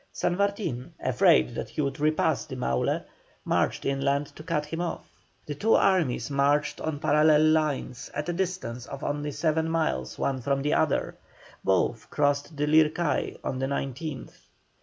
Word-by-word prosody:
San 175 - -1
Martin, 200 - -2
afraid 65 -1 +3
that - - -5
he - - -9
would 140 -1 -2
repass 155 +1 +1
the - - -7
Maule, 65 0 -1 0.4
marched - - 0
inland 140 +1 +1
to - - -10
cut 155 -2 -1
him 165 +3 -4
off. 175 - -4 0.4
The 150 - -4
two 215 +10 +2
armies 150 -11 +2
marched 140 +1 +1
on 160 -2 -2
parallel 150 +1 +4
lines 155 -6 0
at 150 +2 -3
a 175 - -1
distance 170 -10 -3
of 140 +1 -8
only 145 0 -2
seven 160 +2 0
miles 65 - -1
one 130 -2 -1
from 140 +2 0
the 150 - +1
other; - - +1 0.5
both 95 +4 +1
crossed 145 +1 0
the 145 - +1
Lircay 155 +1 +2
on 130 - -3
the 135 - 0
19th. 140 +1 -4
145 Hz, 160 wpm, -27 LUFS, 135-160 Hz, 0.5 s, parallel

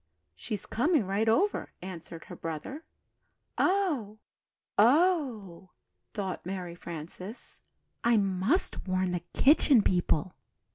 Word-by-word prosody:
"She's 210 -4 -4
coming 290 - +1
right 200 +4 +1
over," 390 - +1
answered 170 -3 -8
her - - -9
brother. 165 - -6 0.8
"Oh, 310 - +1 0.6
oh!" 240 - +2 0.5
thought 195 -4 -3
Mary 180 -1 -5
Frances, 175 +6 -8 0.4
"I 235 -1 +4
must 195 - 0
warn 185 0 0
the 175 -1 -2
Kitchen 275 -5 +5
People." 175 -1 +1
200 Hz, 100 wpm, -29 LUFS, 180-265 Hz, 0.8 s, Kitchen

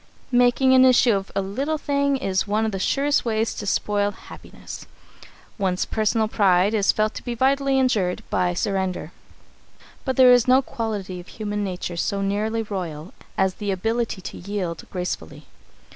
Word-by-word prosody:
Making 245 +1 +4
an 260 0 +7
issue 250 -2 +5
of 195 -1 -3
a 195 - +1
little 275 +11 -2
thing 280 -1 0
is 195 -6 -1
one 215 +2 +1
of 220 - -1
the 195 - -4
surest 280 +8 +1
ways 225 -1 0
to 205 - -6
spoil 205 0 +1
happiness. - - -11 0.7
One's 185 -2 0
personal 220 0 0
pride 195 -2 +3
is 205 -3 +3
felt 215 0 0
to - - -8
be 240 -1 -4
vitally 275 +2 +2
injured 210 -9 +1
by 180 -1 +1
surrender, 190 -4 -2 0.9
but 260 -2 -1
there 255 -1 +7
is 245 -1 +4
no 260 +2 +5
quality 205 -7 -4
of 175 - -12
human 210 -1 -4
nature 180 -2 -4
so 200 +3 -1
nearly 215 +3 -1
royal 180 -6 -6 0.2
as 190 -1 +2
the 205 - -2
ability 225 +2 -1
to - - -7
yield 180 -5 -4
gracefully. 180 -1 -5
210 Hz, 165 wpm, -23 LUFS, 190-245 Hz, 0.9 s, an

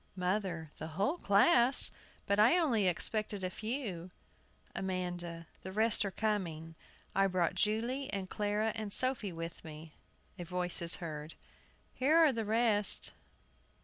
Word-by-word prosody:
MOTHER. 180 -4 -2
The 160 +1 -7
whole 245 - 0
class! 235 +6 +4
I - - -25 0.3
But 200 +1 +1
I 235 +11 +6
only 240 - +2
expected 205 +3 -1
a 185 - -2
few. 215 -7 -4 0.7
AMANDA. 175 -3 -4 0.2
The 190 - -7
rest 220 +2 +2
are - - -1
coming. 175 -6 -2 0.4
I 195 0 +3
brought 180 -3 0
Julie, 235 +6 -1
and 195 -2 -3
Clara, 210 +2 -1
and 215 -2 -5
Sophie 255 -4 +1
with 165 0 -7
me. 155 0 -10 0.5
[A - - -4
voice 180 0 -2
is 170 0 +1
heard. 155 -2 -7 0.3
] - - -35
Here 280 +5 +2
are 320 -4 +6
the 225 -2 -2
rest. 215 -2 +3
200 Hz, 150 wpm, -33 LUFS, 175-220 Hz, 0.7 s, I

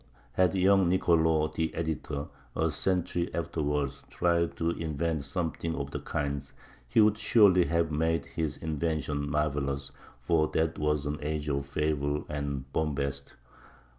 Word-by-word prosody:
Had 95 0 +2
young 95 -1 +4
Nicolò 80 -4 +3
the 80 0 -1
editor, 75 -2 -3 0.3
a 80 0 +1
century 90 +2 -1
afterward, 75 -4 -1 0.2
tried 85 -1 +1
to 85 0 +1
invent 80 -1 -2
something 80 +1 -2
of 70 -1 -4
the - - -3
kind, 70 -1 -3 0.4
he - - +2
would 105 0 +5
surely 95 -8 +5
have 85 -1 +1
made 80 +2 +1
his 80 -4 -3
invention 75 -2 -2
marvelous, 70 -2 -1 0.3
for 80 +5 +2
that 80 0 +1
was 75 -1 +1
an 75 +1 -2
age 75 0 -2
of 70 -1 -1
fable 75 0 -1
and 70 -2 -4
bombast. 70 -3 -2
80 Hz, 135 wpm, -29 LUFS, 70-85 Hz, 0.4 s, would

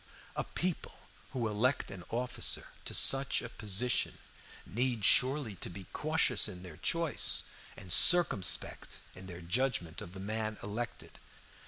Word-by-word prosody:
A - - -1
people 180 -1 -3 0.3
who 125 -4 -2
elect 115 +6 0
an 95 -2 -9
officer 120 +1 -2 0.2
to - - -5
such 135 0 +3
a 120 - -6
position 105 +3 -1 0.5
need 120 0 -1
surely 135 -3 +4
to - - -4
be 95 +2 -9
cautious 155 -8 +2
in 90 -3 -9
their 85 -5 -11
choice 165 - +1 0.3
and 90 - -4
circumspect 170 - +4
in 95 +1 -11
their 90 -1 -9
judgment 90 -3 -1
of 85 - -9
the 95 - -9
man 110 +2 -3
elected. 115 +4 -6
110 Hz, 140 wpm, -32 LUFS, 95-130 Hz, 0.5 s, surely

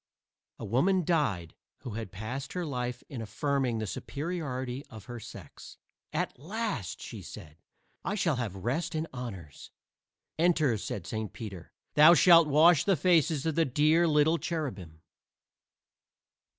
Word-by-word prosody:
A - - -7
woman 175 - +2
died 105 - 0 0.3
who 120 - -6
had 110 -3 -6
passed 125 +8 -6
her 180 -1 -2
life 125 -4 -4
in 125 -4 -6
affirming 125 +2 -1
the 110 - -2
superiority 140 - -4
of 110 -3 -12
her 120 -1 -7
sex. 100 - -11 0.3
"At - - -2
last," 185 - -4
she - - -8
said, 75 +1 -11 0.4
"I 200 - -2
shall 165 -9 +1
have 115 -6 -3
rest 140 - -2
and 155 +1 -1
honors." 95 - -8 0.7
"Enter," 160 -7 +3
said 95 -2 -5
Saint 110 -1 -4
Peter; 100 -7 -8 0.2
"thou 155 +3 +8
shalt 170 -1 +7
wash 155 +2 +5
the 195 +1 +3
faces 160 -3 +2
of 160 - +1
the 165 - +3
dear 155 +4 +3
little 155 +2 +3
cherubim." 100 - -5
140 Hz, 140 wpm, -29 LUFS, 110-165 Hz, 0.7 s, thou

